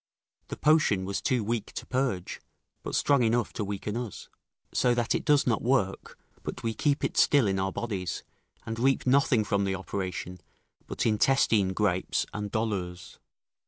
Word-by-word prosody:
The - - -6
potion 150 -11 +3
was 100 +1 -3
too 125 -4 +1
weak 110 0 -3
to - - -6
purge, 125 -9 -2 0.4
but - - -4
strong 140 -3 +3
enough 115 -1 +1
to 105 - -3
weaken 100 +1 -4
us; 120 -4 -6 0.4
so 125 -1 +3
that 120 0 +1
it - - -1
does 145 -2 +3
not 115 -3 +1
work, 115 -6 0 0.2
but - - -6
we 115 -1 -1
keep 145 +4 0
it - - -1
still 140 -5 +5
in 95 -1 0
our 95 0 0
bodies, 95 -7 -4 0.4
and 115 0 -4
reap 135 +2 +2
nothing 130 -3 +3
from 100 -1 0
the 95 -1 0
operation 90 -1 -5 0.5
but - - -3
intestine 110 -3 +3
gripes 95 -3 0
and 105 0 -4
dolours. 95 -6 -3
110 Hz, 165 wpm, -28 LUFS, 95-125 Hz, 0.5 s, still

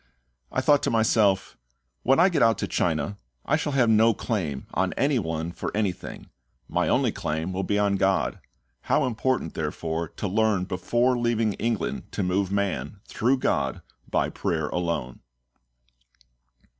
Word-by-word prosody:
I 130 - 0
thought 145 +1 +4
to - - 0
myself, 110 -3 +2 0.5
"When 135 +4 +3
I 180 +3 +6
get 165 -6 0
out 115 -1 +4
to - - -2
China, 85 +4 -1 0.3
I 145 - +2
shall 150 -2 -2
have 130 -3 +3
no 110 0 +5
claim 80 - -3
on - - 0
any 140 -2 +1
one 80 -2 -3
for - - -4
anything; 100 -5 -3 0.4
my - - 0
only - - +2
claim 80 +4 -3
will 95 - -1
be 100 +2 0
on 100 -1 +2
GOD. 95 0 +1 0.5
How 150 - +3
important, 125 -6 -1
therefore, 80 +2 -3
to 105 - -5
learn 105 -1 +2
before 120 +7 +1
leaving 115 -3 +1
England 115 -4 -2
to 100 - -1
move 95 +1 0
man, 100 0 -2
through 125 +4 +1
GOD, 70 - -1 0.3
by - - 0
prayer 80 -3 -2
alone." 85 -8 -2
100 Hz, 155 wpm, -26 LUFS, 85-120 Hz, 0.5 s, I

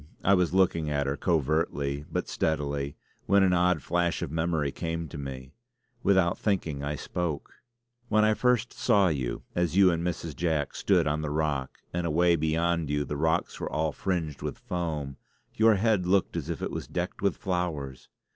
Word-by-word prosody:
I 100 - +5
was 90 -3 +3
looking 85 -4 +2
at 70 -1 0
her, 70 +1 -1
covertly 75 -3 0
but - - -2
steadily 70 -2 -1 0.3
when 100 0 +5
an 95 -1 +4
odd 90 -4 +2
flash 85 0 0
of 80 - -4
memory 80 -3 0
came 80 0 -3
to - - -8
me; 65 -1 -7 0.5
without 95 -3 +3
thinking 85 -9 -1
I 75 +1 -2
spoke: 85 0 -4 0.6
"When 110 0 +4
I 110 - +4
first 120 0 +1
saw 100 -6 +3
you, 65 -6 -2
as 85 +1 0
you 95 -2 +7
and 85 0 -1
Mrs. 85 -3 -3
Jack 80 -2 0
stood - - +2
on 75 +1 0
the 75 - -3
rock, 75 -3 -2
and 85 -1 -1
away 85 +2 +3
beyond 80 0 0
you 75 0 0
the 75 - -4
rocks 80 +4 0
were - - -4
all 80 0 0
fringed 85 -5 -2
with - - -4
foam, 75 -6 -4 0.4
your 110 0 +5
head 100 -3 +2
looked 95 +1 +2
as - - -3
if - - -3
it - - -2
was - - -5
decked - - -4
with - - +1
flowers." 85 -8 -3
80 Hz, 185 wpm, -28 LUFS, 75-90 Hz, 0.6 s, you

